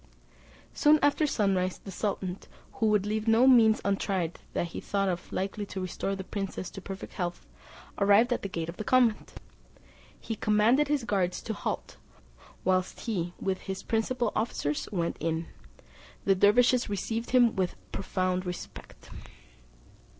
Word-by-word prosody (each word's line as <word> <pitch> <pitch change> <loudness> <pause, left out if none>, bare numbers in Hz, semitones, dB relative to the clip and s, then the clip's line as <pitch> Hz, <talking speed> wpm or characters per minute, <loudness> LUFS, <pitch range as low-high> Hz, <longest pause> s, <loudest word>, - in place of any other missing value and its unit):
Soon 300 0 +5
after 290 +2 +3
sunrise 190 -7 +1
the 195 - -10
sultan, 190 -1 -3 0.3
who 220 - 0
would 210 -2 +3
leave 215 +1 -2
no 225 +3 +5
means 230 -4 +6
untried 195 -4 -1
that 170 - -1
he - - -6
thought 195 -3 -2
likely 195 +2 -2
to 195 - -6
restore 185 +1 -3
the 190 - -6
princess 195 -1 -5
to 195 - -8
perfect 195 +1 -8
health, 175 -1 -4 0.5
arrived 205 +5 +5
at - - -3
the 200 - -4
gate 165 -3 -3
of 170 - -7
the - - -4
convent. 240 -2 +2 0.9
He 225 - -4
commanded 220 +7 +3
his 290 -3 0
guards 190 -5 0
to 225 - -3
halt, - - -4 0.7
whilst 185 0 0
he 175 -7 -2
with 190 -1 -1
his 190 - -4
principal 230 +1 0
officers 150 -10 -1
went 170 -4 -1
in. 165 +1 -1 0.8
The 195 - +5
dervises 235 +5 +4
received 225 +4 -3
him 245 -3 +4
with 185 -2 -1 0.2
profound 185 -1 -1
respect. 180 -1 -8
200 Hz, 150 wpm, -29 LUFS, 185-225 Hz, 0.9 s, means